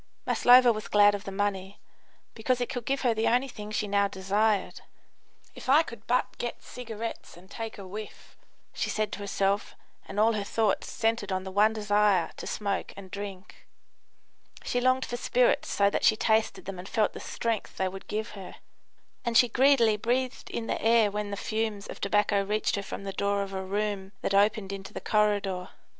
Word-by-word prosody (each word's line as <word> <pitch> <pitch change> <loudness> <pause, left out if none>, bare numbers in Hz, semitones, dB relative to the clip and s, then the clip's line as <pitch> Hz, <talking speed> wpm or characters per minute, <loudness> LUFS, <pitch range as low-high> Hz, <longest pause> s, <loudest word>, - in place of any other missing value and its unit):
Maslova 245 -1 +6
was 215 0 -6
glad 205 0 +5
of 205 0 -5
the 195 - -5
money, 195 -1 -2 0.5
because 245 +3 0
it 245 - -2
could 245 -4 -4
give 275 0 0
her 245 -3 +2
the 220 0 0
only 250 +3 +2
thing 210 -5 -8
she 215 0 -2
now 200 0 +2
desired. 200 +2 0 0.7
"If - - -9
I 295 +5 +6
could 235 -8 -11
but 250 +1 0
get 240 - -4
cigarettes 230 -6 -7
and 185 +2 -17
take 225 -1 -6
a 200 - -8
whiff!" 210 +3 -9 0.4
she - - -2
said 215 -1 -1
to - - -6
herself, 200 0 -1 0.3
and 205 - -4
all 225 +2 +4
her 210 -2 -2
thoughts 215 0 0
centred 225 -3 -1
on 185 0 -1
the 190 - -7
one 210 +3 +4
desire 210 -4 +2
to - - -7
smoke 200 -2 -2
and 190 -2 -10
drink. 200 -2 -8 1.0
She 245 - -1
longed 255 +1 +2
for 240 - -4
spirits - - +2
so 200 0 +2
that - - -1
she 220 - +5
tasted 220 0 +1
them 190 -1 -6
and 185 - -8
felt 215 -2 +1
the - - -7
strength 230 -2 -3
they 190 - +1
would 190 +1 -8
give 215 +2 -3
her; 195 -3 -9 0.7
and 235 -1 +2
she 245 - +6
greedily 240 -3 +4
breathed 250 +4 -1
in 230 - -4
the - - -2
air 225 -2 +4
when 210 0 -3
the 200 - -4
fumes 215 -1 -2
of - - -9
tobacco 205 0 +2
reached 210 +3 0
her 200 - -2
from 200 - -7
the 195 -1 -5
door 200 0 0
of 195 0 -8
a 190 - -3
room 200 0 -3
that - - -1
opened 200 0 +2
into 195 -1 -8
the - - -3
corridor. 205 -3 0
210 Hz, 200 wpm, -28 LUFS, 200-230 Hz, 1.0 s, Maslova